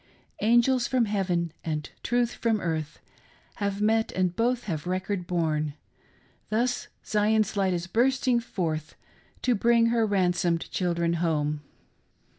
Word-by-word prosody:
Angels 240 Hz, +3 st, +4 dB
from 255 Hz, -3 st, +2 dB
heaven 180 Hz, -5 st, -1 dB
and 150 Hz, -2 st, -3 dB
truth 240 Hz, 0 st, +1 dB
from 225 Hz, -2 st, 0 dB
earth 160 Hz, -4 st, -3 dB, 0.6 s
Have 200 Hz, -1 st, -1 dB
met, 225 Hz, +1 st, +2 dB
and 185 Hz, -1 st, 0 dB
both 240 Hz, +3 st, +1 dB
have 165 Hz, -4 st, -4 dB
record 185 Hz, 0 st, -2 dB
borne; 155 Hz, -4 st, 0 dB, 0.7 s
Thus 245 Hz, +3 st, 0 dB, 0.2 s
Zion's 215 Hz, 0 st, +2 dB
light 195 Hz, -2 st, +2 dB
is 170 Hz, 0 st, -3 dB
bursting 250 Hz, +4 st, +2 dB
forth 165 Hz, -9 st, -3 dB, 0.5 s
To 250 Hz, -, +3 dB
bring 235 Hz, +1 st, +4 dB
her 230 Hz, -2 st, +2 dB
ransomed 180 Hz, -3 st, +1 dB
children 170 Hz, -2 st, 0 dB
home. 150 Hz, -3 st, 0 dB
195 Hz, 125 wpm, -27 LUFS, 170-230 Hz, 0.7 s, Angels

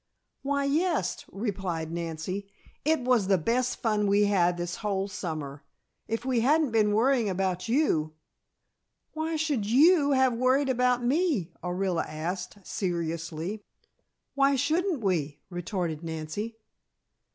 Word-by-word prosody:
"Why, 280 Hz, 0 st, 0 dB
yes," 330 Hz, +5 st, 0 dB
replied 190 Hz, -6 st, -3 dB
Nancy. 170 Hz, +4 st, -4 dB, 0.3 s
"It 315 Hz, -1 st, +2 dB
was 245 Hz, -5 st, +2 dB
the 195 Hz, -1 st, +4 dB
best 240 Hz, +9 st, 0 dB
fun 210 Hz, -3 st, +2 dB
we 200 Hz, +1 st, +4 dB
had 180 Hz, -4 st, +2 dB
this 175 Hz, 0 st, -3 dB
whole 200 Hz, -2 st, -1 dB
summer. 155 Hz, -7 st, -5 dB, 0.4 s
If 225 Hz, +2 st, -3 dB
we 255 Hz, -3 st, +2 dB
hadn't 290 Hz, +3 st, +3 dB
been 210 Hz, -2 st, +3 dB
worrying 240 Hz, -1 st, +3 dB
about 185 Hz, 0 st, -1 dB
you 165 Hz, -, +1 dB, 0.5 s
" -, -, -53 dB
"Why 315 Hz, +1 st, -2 dB
should 295 Hz, -9 st, 0 dB
you 285 Hz, -, +5 dB
have 260 Hz, -2 st, +4 dB
worried 260 Hz, +3 st, +2 dB
about 250 Hz, -1 st, +2 dB
me?" 270 Hz, -, +1 dB
Orilla 180 Hz, -1 st, 0 dB
asked, 180 Hz, +5 st, -5 dB
seriously. 170 Hz, 0 st, -3 dB, 0.7 s
"Why 275 Hz, 0 st, +3 dB
shouldn't 315 Hz, +3 st, 0 dB
we?" 155 Hz, -7 st, 0 dB
retorted 175 Hz, -3 st, -3 dB
Nancy. 165 Hz, +8 st, -5 dB
205 Hz, 130 wpm, -28 LUFS, 175-260 Hz, 0.7 s, you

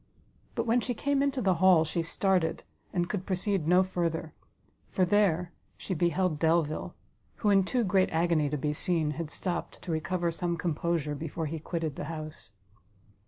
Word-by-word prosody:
But -, -, -1 dB
when 235 Hz, +1 st, +3 dB
she 245 Hz, 0 st, -2 dB
came 280 Hz, +3 st, +1 dB
into 275 Hz, -3 st, 0 dB
the 190 Hz, -2 st, +4 dB
hall, 180 Hz, -4 st, +6 dB
she 165 Hz, +2 st, -1 dB
started, 170 Hz, 0 st, 0 dB, 0.3 s
and 175 Hz, -1 st, 0 dB
could 195 Hz, -1 st, -3 dB
proceed 190 Hz, -3 st, 0 dB
no 180 Hz, +2 st, +5 dB
further; 170 Hz, -4 st, -2 dB, 0.6 s
for 185 Hz, -, +2 dB
there 180 Hz, -3 st, +2 dB, 0.3 s
she 190 Hz, -, -4 dB
beheld 175 Hz, -1 st, +1 dB
Delvile, 160 Hz, -1 st, +1 dB, 0.4 s
who 210 Hz, -, +1 dB
in 195 Hz, -1 st, +5 dB
too 245 Hz, +5 st, 0 dB
great 190 Hz, -2 st, +3 dB
agony 160 Hz, -2 st, +2 dB
to 150 Hz, -, -1 dB
be 150 Hz, +2 st, -1 dB
seen, 160 Hz, -1 st, 0 dB
had 155 Hz, +1 st, -4 dB
stopt 175 Hz, +1 st, -4 dB
to 175 Hz, -, -4 dB
recover 170 Hz, +2 st, -1 dB
some 170 Hz, +1 st, -2 dB
composure 165 Hz, -2 st, -1 dB
before 160 Hz, +2 st, -4 dB
he 160 Hz, +1 st, -4 dB
quitted 160 Hz, -2 st, -3 dB
the -, -, -4 dB
house. 155 Hz, -8 st, -7 dB
170 Hz, 170 wpm, -29 LUFS, 160-190 Hz, 0.6 s, hall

